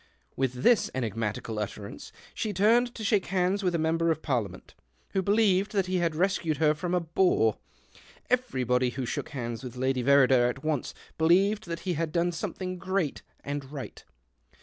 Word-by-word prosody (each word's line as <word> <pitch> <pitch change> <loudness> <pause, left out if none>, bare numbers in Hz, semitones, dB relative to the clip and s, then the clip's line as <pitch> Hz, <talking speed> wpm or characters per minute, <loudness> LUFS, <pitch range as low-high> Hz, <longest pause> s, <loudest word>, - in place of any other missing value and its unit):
With 125 -1 -2
this 240 -3 +4
enigmatical 110 -2 -3
utterance 100 -1 -6 0.2
she 215 -2 -3
turned 235 +6 +3
to 220 - -6
shake 200 -2 +1
hands 190 +1 +1
with 180 -3 0
a - - +2
member 165 +1 +1
of 160 -1 -1
parliament, 110 - -3 0.4
who 190 - +1
believed 200 0 +2
that 195 -3 +2
he 185 0 -1
had 170 -3 0
rescued 170 -3 0
her 150 0 +3
from 175 +4 -2
a - - +3
bore; 165 - +2 0.7
everybody 130 - +1
who 125 +1 -4
shook 140 - -4
hands 120 -4 -5
with 125 -1 -7
Lady 130 0 0
Verrider 130 -2 +5
at 135 +2 -6
once 155 -4 -2 0.2
believed 195 +6 +3
that 170 0 -4
he 185 - -1
had 165 0 -2
done 175 +1 +1
something 185 +2 -5
great 185 -4 -1 0.2
and 140 -1 -5
right. 140 -3 -8
160 Hz, 170 wpm, -28 LUFS, 130-185 Hz, 0.7 s, Verrider